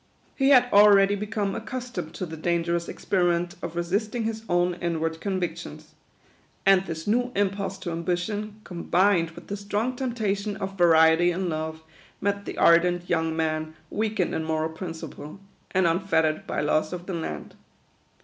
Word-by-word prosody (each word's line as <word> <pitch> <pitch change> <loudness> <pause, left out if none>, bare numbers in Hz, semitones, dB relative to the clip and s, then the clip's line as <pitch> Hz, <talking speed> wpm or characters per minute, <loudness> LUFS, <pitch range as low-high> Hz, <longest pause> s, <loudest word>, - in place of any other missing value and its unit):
He 270 0 +3
had 250 -3 +6
already 200 -1 +7
become 205 -1 -2
accustomed 250 -11 -5
to 185 - -3
the 160 -1 -7
danger 170 +1 0
ous 170 0 -3
experiment 175 -2 0
of 165 - -5
resisting 205 +7 -1
his 220 0 -3
own 175 0 +2
inward 165 -1 -2
convic 185 -3 -1
tions; - - -10 0.7
and 195 -1 +6
this 165 -1 -5
new 245 +4 +1
impulse 195 -1 -1
to 185 -2 -5
ambition, 195 +5 -3
combined 175 0 +1
with 165 - -13
the 200 - -4
strong 205 +5 -2
temptation 215 -5 -2
of 195 -2 -5
variety 165 -1 +5
in 180 +1 -1
love, 160 0 -4 0.4
met 200 0 -1
the - - -6
ardent 175 +1 +4
young 160 -1 +1
man 155 -1 -1 0.2
weakened 215 -4 -1
in 160 - -1
moral 160 0 -1
principle, 160 0 -8 0.3
and 190 -1 +2
unfettered 165 -3 +1
by - - -1
laws 155 +3 +1
of 175 -1 -6
the 190 - -5
land. 75 - -5
180 Hz, 160 wpm, -26 LUFS, 165-205 Hz, 0.7 s, already